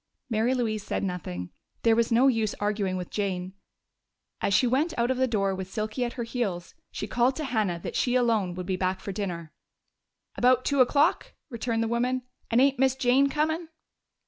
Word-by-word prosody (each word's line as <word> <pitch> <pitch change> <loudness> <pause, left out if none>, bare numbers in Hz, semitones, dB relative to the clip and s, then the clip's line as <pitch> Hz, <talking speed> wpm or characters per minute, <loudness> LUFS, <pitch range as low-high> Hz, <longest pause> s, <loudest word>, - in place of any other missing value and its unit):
Mary 230 +4 +2
Louise 220 -4 -1
said - - -2
nothing: 150 - -4 0.3
there 230 -1 +5
was 235 0 +1
no 245 +4 +5
use 225 -5 +1
arguing 205 -2 -1
with 180 -1 -6
Jane. 185 -3 -2 0.9
As - - +1
she 195 - +4
went 285 +7 +1
out 235 +2 +2
of 260 - -1
the 260 0 +2
door 195 -4 0
with 190 -1 -5
Silky 215 +4 -2
at 240 - -2
her 240 - -4
heels 210 -7 -3 0.2
she - - -4
called 245 +5 +1
to 310 - -4
Hannah 215 - 0
that - - -5
she 245 0 +1
alone 225 -8 +2
would 180 0 -5
be 185 0 -1
back 185 0 -1
to 200 - -4
dinner. 175 -5 -4 0.8
"About 255 0 +3
two 280 -2 +3
o'clock," 285 +5 +2 0.2
returned 230 -1 -1
the - - -1
woman. 245 +2 0 0.3
"And 230 - +3
ain't 275 0 +3
Miss 265 -1 +3
Jane 265 +2 +3
comin'?" 315 +3 -1
230 Hz, 195 wpm, -27 LUFS, 195-255 Hz, 0.9 s, there